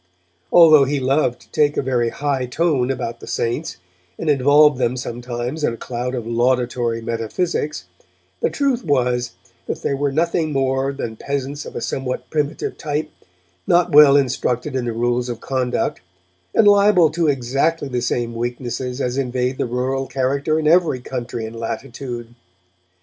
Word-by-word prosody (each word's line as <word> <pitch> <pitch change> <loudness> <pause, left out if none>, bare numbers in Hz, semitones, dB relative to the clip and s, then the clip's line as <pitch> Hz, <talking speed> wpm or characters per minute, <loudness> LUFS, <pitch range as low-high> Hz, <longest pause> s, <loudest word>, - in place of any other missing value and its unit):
Although 155 -5 +7
he 140 +1 -1
loved 130 -1 +1
to - - -22
take 150 -1 +2
a - - +1
very 125 -3 +1
high 135 -1 -2
tone 135 -2 +1
about 120 -3 -3
the - - -11
Saints, 120 +7 -2 0.4
and 155 - +1
involved 145 +1 +5
them 125 0 0
sometimes 120 +4 -5
in 115 - +1
a - - -14
cloud 125 +2 -4
of 120 -3 -4
laudatory 120 -1 0
metaphysics, 115 - -2 0.5
the - - +1
truth 275 -4 0
was 125 -5 0 0.3
that - - -4
they - - 0
were 140 0 0
nothing 160 +1 0
more 135 0 0
than 115 -5 -5
peasants 140 +2 -4
of - - -10
a - - -3
somewhat 125 -2 -4
primitive 150 -2 -2
type, 150 +1 -3 0.6
not 175 0 +3
well 145 -1 +8
instructed 130 0 -1
in 130 -2 -1
the 120 - -1
rules 120 +2 0
of 120 -2 -4
conduct 130 -1 -2 0.5
and 210 - +5
liable 200 -5 +5
to 170 -1 0
exactly 140 +4 0
the 125 -2 -2
same 120 -1 -1
weaknesses 120 +2 -4
as 125 +1 -1
invade 125 0 -1
the - - 0
rural 130 +2 -2
character 140 +4 0
in 155 -1 0
every 165 -5 +3
country 120 -2 -5
and 110 +1 -8
latitude. 120 0 -6
130 Hz, 160 wpm, -20 LUFS, 120-145 Hz, 0.6 s, well